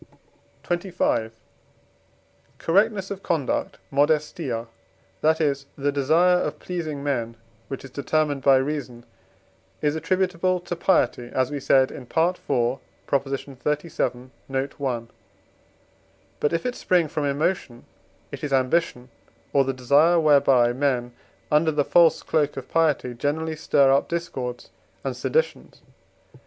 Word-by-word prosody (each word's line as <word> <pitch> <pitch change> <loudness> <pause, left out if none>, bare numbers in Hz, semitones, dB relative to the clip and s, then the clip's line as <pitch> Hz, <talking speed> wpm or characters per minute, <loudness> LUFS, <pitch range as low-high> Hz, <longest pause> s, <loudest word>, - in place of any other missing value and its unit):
XXV. 175 - -1 1.3
Correctness 195 +2 +1
of 195 -1 -5
conduct 155 -9 -1
(modestia), 145 -4 0 0.6
that 160 +1 +3
is, 140 -3 0
the 145 0 0
desire 160 +6 +3
of - - -3
pleasing 155 -6 -5
men 120 -5 -2 0.3
which 135 0 -6
is 135 - -11
determined 145 +1 0
by 135 0 +5
reason, 130 -3 -2 0.7
is 150 0 0
attributable 185 +2 0
to 175 0 -5
piety 130 -9 +1
(as 130 +1 0
we 145 - -3
said 130 0 +3
in - - -8
IV. 125 - -15 1.0
xxxvii. 135 -1 -2 0.2
note. 135 +1 -3
i.). 125 -4 -1 1.4
But, 150 - +1
if 165 +6 -1
it 250 - -1
spring 180 -8 +1
from 150 0 -2
emotion, 140 -3 -2 0.5
it - - -8
is 145 - -3
ambition, 130 -1 +1 0.4
or 140 - +5
the 135 - -1
desire 140 +7 +4
whereby, 135 -6 +4
men, 125 -2 -1 0.4
under 150 +2 +4
the 145 -2 0
false 165 -2 +4
cloak 150 -3 0
of 130 -1 -7
piety, 155 -6 +1
generally 155 +5 -2
stir 140 -3 +3
up 140 - +2
discords 130 -8 -4 0.3
and - - -3
seditions. 475 +1 -2
145 Hz, 125 wpm, -24 LUFS, 130-165 Hz, 1.4 s, by